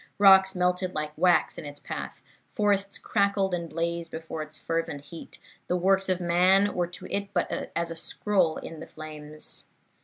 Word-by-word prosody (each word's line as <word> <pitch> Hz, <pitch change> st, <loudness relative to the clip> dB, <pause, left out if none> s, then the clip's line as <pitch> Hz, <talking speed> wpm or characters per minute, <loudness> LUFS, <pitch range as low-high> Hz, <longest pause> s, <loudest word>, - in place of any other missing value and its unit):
Rocks 190 Hz, -1 st, +7 dB
melted 180 Hz, 0 st, 0 dB
like 150 Hz, 0 st, -3 dB
wax 175 Hz, +1 st, +3 dB
in -, -, -8 dB
its 145 Hz, 0 st, -7 dB
path; -, -, -6 dB, 0.3 s
forests 200 Hz, -2 st, +1 dB
crackled 200 Hz, -1 st, +1 dB
and 170 Hz, -2 st, -2 dB
blazed 170 Hz, +1 st, -2 dB
before 160 Hz, -1 st, -6 dB
its 155 Hz, 0 st, -6 dB
fervent 165 Hz, -4 st, -2 dB
heat; 165 Hz, +3 st, -10 dB, 0.3 s
the 180 Hz, -, +1 dB
works 195 Hz, +2 st, +2 dB
of 185 Hz, -1 st, +1 dB
man 185 Hz, +3 st, +4 dB
were 175 Hz, -1 st, 0 dB
to 175 Hz, -, -10 dB
it 200 Hz, 0 st, -3 dB
but -, -, -1 dB
as 170 Hz, 0 st, -1 dB
a -, -, -5 dB
scroll 180 Hz, -1 st, 0 dB
in 165 Hz, -, -8 dB
the -, -, -8 dB
flames. 155 Hz, -1 st, -5 dB
175 Hz, 175 wpm, -27 LUFS, 160-190 Hz, 0.3 s, Rocks